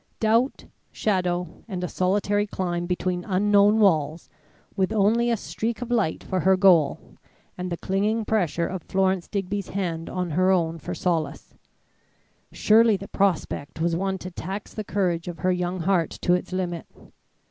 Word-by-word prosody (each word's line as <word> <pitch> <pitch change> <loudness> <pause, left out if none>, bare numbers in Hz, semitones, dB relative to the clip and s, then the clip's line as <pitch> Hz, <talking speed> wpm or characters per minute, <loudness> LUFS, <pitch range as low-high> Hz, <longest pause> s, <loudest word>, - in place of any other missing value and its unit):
Doubt, 230 +4 +1 0.3
shadow, 180 -4 -1
and 185 -4 -4
a - - -1
solitary 205 +3 0
climb 175 -3 -2
between 180 0 -1
unknown 205 +2 +3
walls, 160 -5 +2 0.4
with 190 0 0
only 220 +3 +3
a 230 - +1
streak 225 +2 -3
of 245 -1 -6
light 220 -9 0
for 185 - -2
her 190 +1 +4
goal, 175 -7 +3 0.4
and 180 0 -5
the 170 - -2
clinging 210 +5 0
pressure 175 -6 0
of 185 +1 -4
Florence 190 0 0
Digby's 200 -1 -3
hand 170 -4 -3
on 180 -2 -3
her 185 +4 +2
own 165 -3 +1
for - - -5
solace 160 -5 -2 1.0
surely 220 -1 +4
the 195 +1 -10
prospect 175 -5 -1
was 170 0 +1
one 190 +2 -1
to 185 0 -8
tax 190 +4 -6
the 215 - -4
courage 180 -5 -1
of 175 -1 -5
her 185 +3 +1
young 180 0 -2
heart 175 -2 +1
to 175 - 0
its 180 - -1
limit. 180 -3 -3
185 Hz, 160 wpm, -25 LUFS, 175-205 Hz, 1.0 s, her